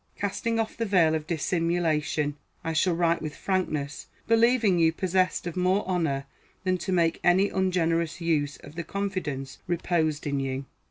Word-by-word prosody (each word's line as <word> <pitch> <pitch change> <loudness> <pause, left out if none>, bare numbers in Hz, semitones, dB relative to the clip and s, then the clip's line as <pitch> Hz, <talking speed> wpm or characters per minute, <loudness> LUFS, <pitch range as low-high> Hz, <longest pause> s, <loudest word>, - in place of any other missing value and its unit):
Casting 225 +3 -1
off 220 -1 -1
the 230 - -1
veil 175 -5 +4
of 155 -1 -2
dissimulation, 160 -3 0 0.3
I 165 - -2
shall 170 +2 +2
write 170 0 +2
with 155 -1 -5
frankness, 155 -7 -2 0.2
believing 230 -4 +4
you 165 -1 +5
possessed 185 +2 0
of 175 - -4
more 185 +2 +1
honor 160 -7 0 0.4
than 185 -1 +1
to 180 - -3
make 170 -2 +2
any 190 +3 +4
ungenerous 170 -3 0
use 150 -4 0
of 145 - -11
the 170 +1 -4
confidence 165 -8 -4
reposed 165 -3 0
in 140 -1 0
you. 135 0 -3
170 Hz, 160 wpm, -27 LUFS, 155-185 Hz, 0.4 s, you